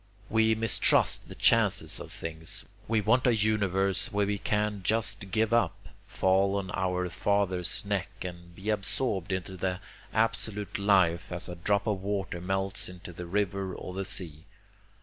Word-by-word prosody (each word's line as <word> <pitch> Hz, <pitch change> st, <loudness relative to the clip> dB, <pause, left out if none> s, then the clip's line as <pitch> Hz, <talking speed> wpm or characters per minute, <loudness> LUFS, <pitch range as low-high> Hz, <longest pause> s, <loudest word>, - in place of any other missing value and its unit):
We 110 Hz, 0 st, +4 dB
mistrust 115 Hz, 0 st, +2 dB
the -, -, -8 dB
chances -, -, +3 dB
of -, -, -8 dB
things. 80 Hz, -1 st, -5 dB, 0.2 s
We 110 Hz, -1 st, +2 dB
want 125 Hz, +5 st, +3 dB
a 120 Hz, -, +4 dB
universe 100 Hz, -3 st, +1 dB
where 100 Hz, 0 st, +1 dB
we 100 Hz, 0 st, -1 dB
can 105 Hz, -1 st, -1 dB
just 105 Hz, 0 st, +1 dB
give 110 Hz, +2 st, +1 dB
up, 120 Hz, -, 0 dB, 0.2 s
fall 95 Hz, +1 st, +2 dB
on 95 Hz, -2 st, -4 dB
our 90 Hz, 0 st, 0 dB
father's 95 Hz, 0 st, +1 dB
neck, 100 Hz, -2 st, -1 dB
and 85 Hz, -1 st, -8 dB
be 100 Hz, +4 st, -2 dB
absorbed 105 Hz, -2 st, -1 dB
into 95 Hz, 0 st, -3 dB
the 90 Hz, 0 st, -2 dB, 0.3 s
absolute 110 Hz, -3 st, 0 dB
life 90 Hz, -4 st, +3 dB
as 85 Hz, 0 st, -2 dB
a 90 Hz, -, -6 dB
drop 100 Hz, +4 st, 0 dB
of 105 Hz, -4 st, -1 dB
water 95 Hz, -3 st, -3 dB
melts 95 Hz, +1 st, 0 dB
into 90 Hz, -1 st, -10 dB
the 90 Hz, +1 st, -7 dB
river 100 Hz, 0 st, -1 dB
or 90 Hz, -, -7 dB
the 95 Hz, +1 st, -3 dB
sea. 90 Hz, -6 st, -4 dB
95 Hz, 160 wpm, -29 LUFS, 90-105 Hz, 0.3 s, We